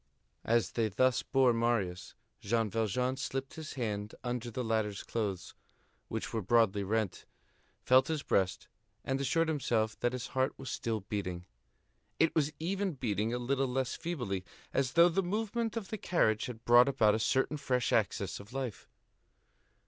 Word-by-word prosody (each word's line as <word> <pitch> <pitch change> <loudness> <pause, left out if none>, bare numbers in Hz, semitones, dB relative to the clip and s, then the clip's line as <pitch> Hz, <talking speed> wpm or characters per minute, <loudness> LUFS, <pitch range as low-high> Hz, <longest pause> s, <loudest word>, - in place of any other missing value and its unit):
As 115 -3 +2
they 115 -2 0
thus 130 +5 +2
bore 130 -3 +3
Marius, 115 -6 -1 0.2
Jean 110 0 0
Valjean 125 +4 0
slipped 135 -1 -4
his 160 -1 -7
hand 105 -5 -3
under 120 -1 -3
the 125 +2 -3
latter's 110 -3 -1
clothes, 100 -6 -3 0.5
which - - -4
were 110 - 0
broadly 105 -1 +3
rent, 105 -1 -2 0.6
felt 130 +1 +5
his 160 -3 -2
breast, 95 -2 0 0.4
and 135 +1 -1
assured 165 +5 +2
himself 115 -8 0
that 120 0 0
his 125 -2 -3
heart 130 +1 0
was 135 - -6
still 110 -2 -2
beating. 90 -3 -4 0.7
It 165 - +4
was 150 -2 +1
even 190 +3 -1
beating 110 -5 -1
a 120 - -1
little 135 +2 0
less 130 0 -1
feebly, 120 - -3 0.3
as 130 -2 +1
though 170 +1 +7
the 175 +3 +1
movement 225 +4 -2
of 210 -4 -5
the 215 - -3
carriage 110 -14 +1
had 115 -2 -9
brought 120 +2 +7
about 115 -6 +4
a 110 - 0
certain 135 +6 +1
fresh 125 -3 0
access 100 -4 0
of 100 +4 -12
life. 130 -6 -5
120 Hz, 165 wpm, -32 LUFS, 110-135 Hz, 0.7 s, though